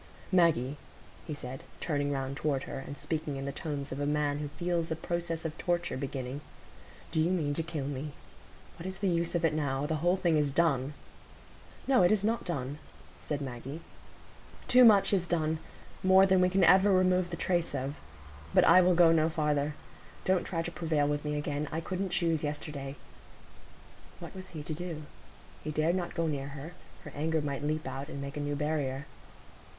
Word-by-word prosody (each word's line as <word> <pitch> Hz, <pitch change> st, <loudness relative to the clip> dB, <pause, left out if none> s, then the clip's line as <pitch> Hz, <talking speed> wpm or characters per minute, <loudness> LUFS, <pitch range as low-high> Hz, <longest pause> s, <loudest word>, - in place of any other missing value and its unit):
"Maggie," 155 Hz, -7 st, +3 dB, 0.5 s
he 155 Hz, -, -3 dB
said, 130 Hz, -1 st, -7 dB, 0.2 s
turning 145 Hz, -3 st, -1 dB
round 135 Hz, -1 st, -2 dB
toward 140 Hz, -2 st, -1 dB
her, -, -, -5 dB
and 140 Hz, +1 st, -7 dB
speaking 155 Hz, -3 st, -3 dB
in 135 Hz, 0 st, -4 dB
the 140 Hz, -, -2 dB
tones 140 Hz, -1 st, -4 dB
of 130 Hz, -, -4 dB
a 145 Hz, -, 0 dB
man 145 Hz, -1 st, +1 dB
who 150 Hz, -, -3 dB
feels 170 Hz, +2 st, -2 dB
a 160 Hz, -, -1 dB
process 170 Hz, 0 st, -3 dB
of 160 Hz, -1 st, -3 dB
torture 175 Hz, 0 st, 0 dB
beginning, 130 Hz, 0 st, -4 dB, 0.7 s
"do 160 Hz, -, 0 dB
you 160 Hz, +2 st, +3 dB
mean 155 Hz, -6 st, 0 dB
to 165 Hz, -, 0 dB
kill 160 Hz, -4 st, -4 dB
me? 145 Hz, +1 st, -4 dB, 0.7 s
What 170 Hz, -, -5 dB
is 190 Hz, 0 st, -5 dB
the 200 Hz, -, -1 dB
use 170 Hz, -1 st, 0 dB
of 170 Hz, -1 st, +2 dB
it 155 Hz, -, +2 dB
now? 140 Hz, -2 st, 0 dB
The 155 Hz, +1 st, 0 dB
whole 175 Hz, +4 st, +3 dB
thing 170 Hz, -4 st, +2 dB
is 150 Hz, -1 st, +2 dB
done." 145 Hz, -2 st, +1 dB, 0.9 s
"No, 265 Hz, -6 st, +4 dB
it 175 Hz, -, +5 dB
is 210 Hz, -2 st, +2 dB
not 225 Hz, +2 st, 0 dB
done," 145 Hz, -3 st, -3 dB, 0.4 s
said 145 Hz, -2 st, -3 dB
Maggie. 135 Hz, +3 st, -6 dB, 0.9 s
"Too 255 Hz, 0 st, +7 dB
much 210 Hz, -4 st, +7 dB
is 180 Hz, -3 st, +2 dB
done,—more 170 Hz, +4 st, +2 dB
than 190 Hz, -1 st, +4 dB
we 180 Hz, -, +4 dB
can 190 Hz, 0 st, +2 dB
ever 190 Hz, +4 st, +6 dB
remove 185 Hz, -1 st, +3 dB
the 170 Hz, -, -5 dB
trace 175 Hz, -4 st, 0 dB
of. 135 Hz, +2 st, -3 dB, 0.6 s
But -, -, +7 dB
I 185 Hz, -, +8 dB
will 180 Hz, 0 st, +4 dB
go 170 Hz, -1 st, +7 dB
no 160 Hz, -1 st, +3 dB
farther. 150 Hz, -2 st, 0 dB, 0.5 s
Don't 185 Hz, -1 st, +2 dB
try 165 Hz, -3 st, -2 dB
to 170 Hz, -, -4 dB
prevail 155 Hz, -4 st, 0 dB
with 145 Hz, 0 st, -1 dB
me 150 Hz, 0 st, -2 dB
again. 145 Hz, 0 st, -2 dB
I 160 Hz, -, -1 dB
couldn't 185 Hz, +3 st, -3 dB
choose 165 Hz, -3 st, +1 dB
yesterday." 145 Hz, -2 st, -4 dB, 1.2 s
What -, -, -9 dB
was 185 Hz, 0 st, -8 dB
he 155 Hz, -3 st, -7 dB
to 155 Hz, -, -3 dB
do? 165 Hz, -1 st, -5 dB, 0.6 s
He 155 Hz, -, -4 dB
dared 155 Hz, +3 st, +1 dB
not 175 Hz, -2 st, -3 dB
go 165 Hz, -1 st, +1 dB
near 140 Hz, -3 st, -2 dB
her; 145 Hz, +4 st, -8 dB, 0.3 s
her -, -, -9 dB
anger 160 Hz, +2 st, 0 dB
might 145 Hz, -2 st, -3 dB
leap 155 Hz, +1 st, -1 dB
out, 135 Hz, +1 st, -5 dB
and 140 Hz, -, -6 dB
make 140 Hz, +1 st, -6 dB
a -, -, -3 dB
new 145 Hz, 0 st, -1 dB
barrier. 145 Hz, -2 st, -1 dB
155 Hz, 195 wpm, -30 LUFS, 145-175 Hz, 1.2 s, I